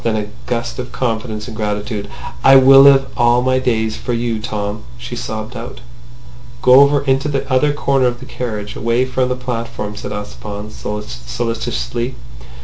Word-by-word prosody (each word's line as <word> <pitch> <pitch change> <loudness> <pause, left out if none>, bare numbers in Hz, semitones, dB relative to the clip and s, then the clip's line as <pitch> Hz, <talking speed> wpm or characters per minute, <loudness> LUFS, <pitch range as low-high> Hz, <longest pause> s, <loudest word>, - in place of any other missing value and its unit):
Then 115 -2 +1
in 105 - -1
a - - -14 0.2
gust 120 0 -3
of 125 0 -5
confidence 110 -3 -3
and 115 - -8
gratitude, 105 -1 -3 0.3
"I 135 - +8
will 135 +1 +8
live 135 -1 +7
all 120 +1 +3
my 130 0 +2
days 110 -4 0
for 120 - -3
you, 115 -1 -1
Tom!" 105 -1 -4 0.2
she - - -7
sobbed 110 +3 -5
out. 120 - -7 0.8
"Go 125 +1 +8
over 140 0 +5
into 135 +1 +1
the 140 -2 -2
other 145 +3 +3
corner 135 -3 +1
of 120 0 -2
the - - -10
carriage, 105 -4 -5
away 115 +3 +1
from 130 0 0
the 125 - 0
platform," 115 -4 -4
said - - -6
Ossipon 105 0 -6
solicitously. 115 - -4
120 Hz, 170 wpm, -18 LUFS, 110-130 Hz, 0.8 s, I